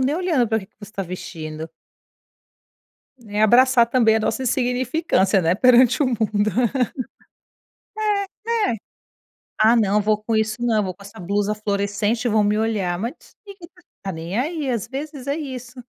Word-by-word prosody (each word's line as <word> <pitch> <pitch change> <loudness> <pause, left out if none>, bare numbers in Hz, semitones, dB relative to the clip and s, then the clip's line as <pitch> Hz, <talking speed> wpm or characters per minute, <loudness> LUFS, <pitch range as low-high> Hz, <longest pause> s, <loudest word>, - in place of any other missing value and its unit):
nem 265 +3 +1
olhando 325 - +1
para 220 - +1
o - - -6
que 190 - -12
que - - -46
você 205 0 -11
tá 195 - -3
vestindo. 160 -3 -7 1.6
É 210 0 -2
abraçar 240 +2 +5
também 230 -3 +3
a 220 - 0
nossa 225 +4 -1
insignificância, 250 - +1
né, 170 0 +2
perante 250 +5 +5
o - - +2
mundo. 215 -3 0 2.0
É, 460 - +1
é. - - -2 0.9
"Ah 225 +2 +6
não, 210 -2 +3
vou 210 0 0
com 225 +1 -2
isso 220 0 0
não, 225 -3 +2
vou 185 -2 -4
com 200 - -17
essa 200 -2 -12
blusa 200 +3 -1
fluorescente 205 +2 -1
e - - +2
vão 215 0 +3
me 205 +1 +1
olhar", 205 -6 -1
mas 230 +6 -3 0.3
ninguém 390 -4 -12 0.3
tá 195 - -4
nem 165 +5 -4
aí, 295 0 -2
às 230 -3 -2
vezes 280 0 -6
é 280 +2 -1
isso. 255 -4 -7
220 Hz, 170 wpm, -22 LUFS, 205-255 Hz, 2.0 s, Ah